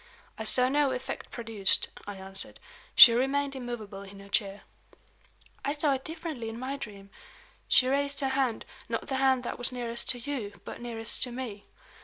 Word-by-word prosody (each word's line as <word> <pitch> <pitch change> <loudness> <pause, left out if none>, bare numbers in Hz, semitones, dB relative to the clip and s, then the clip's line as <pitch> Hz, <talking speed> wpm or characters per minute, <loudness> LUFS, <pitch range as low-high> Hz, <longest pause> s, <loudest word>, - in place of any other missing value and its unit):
"I - - -6
saw 250 0 +4
no 285 +1 +3
effect 255 0 -5
produced," 225 -5 +1 0.2
I 205 - -5
answered. 195 0 -5 0.4
"She 260 -3 +12
remained 275 +3 +1
immovable 235 -6 -6
in 200 0 -11
her 200 0 -13
chair." 200 -1 0 1.0
"I 285 - 0
saw 295 -1 +2
it 265 0 -3
differently 315 -8 -5
in 225 - -7
my 260 +3 -3
dream. 200 -7 -9 0.6
She 255 - +5
raised 280 +1 +1
her 270 - +1
hand 265 -4 0 0.2
not - - -2
the 265 - 0
hand 265 -1 +3
that 240 - -5
was 245 +1 +3
nearest 235 -1 -1
to 245 - +3
you, 235 -6 -5
but - - -8
nearest 225 -2 -2
to 250 - 0
me. 235 -5 -6
245 Hz, 180 wpm, -29 LUFS, 215-270 Hz, 1.0 s, She